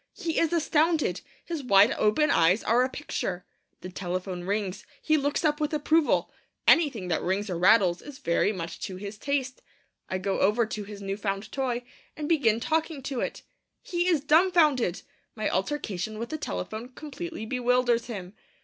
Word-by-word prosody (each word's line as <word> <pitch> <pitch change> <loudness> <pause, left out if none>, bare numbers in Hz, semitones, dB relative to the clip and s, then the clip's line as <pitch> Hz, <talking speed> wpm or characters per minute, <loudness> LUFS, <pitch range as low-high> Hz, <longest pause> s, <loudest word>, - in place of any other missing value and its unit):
He 335 -5 -2
is 330 - +2
astounded. 320 -1 +1 0.2
His 330 -3 -4
wide 205 -4 +5
open 260 +9 +2
eyes 170 +6 +4
are 235 +3 +3
a 255 - 0
picture. 190 - -4 0.4
The 185 - -7
telephone 180 0 -4
rings. 200 0 -2 0.2
He 310 - +2
looks 290 +3 0
up 300 0 +1
with 300 +1 0
approval. 310 +1 +2 0.4
Anything 265 - +4
that 160 - 0
rings 195 +2 -1
or 175 - -2
rattles 185 -2 +4
is 290 -2 -10
very 170 +2 +1
much 170 -4 -6
to 190 - -7
his 200 +2 -7
taste. 275 -1 -2 0.5
I 185 - -1
go 190 +1 -2
over 215 +4 +3
to 215 -1 -5
his 200 0 -9
new 195 0 -3
found 200 0 -3
toy, 250 -3 -2 0.3
and 300 -1 -3
begin 255 -9 +3
talking 315 +1 -1
to 270 -2 -3
it. - - -4 0.4
He 350 0 -1
is 335 -6 +3
dumbfounded. 305 - +3 0.3
My 215 - -1
altercation 215 -3 -2
with 230 +2 -5
the 315 - -3
telephone 215 - -5
completely 305 +1 -7
bewilders 245 -1 +1
him. 195 -5 -7
235 Hz, 170 wpm, -27 LUFS, 195-295 Hz, 0.5 s, wide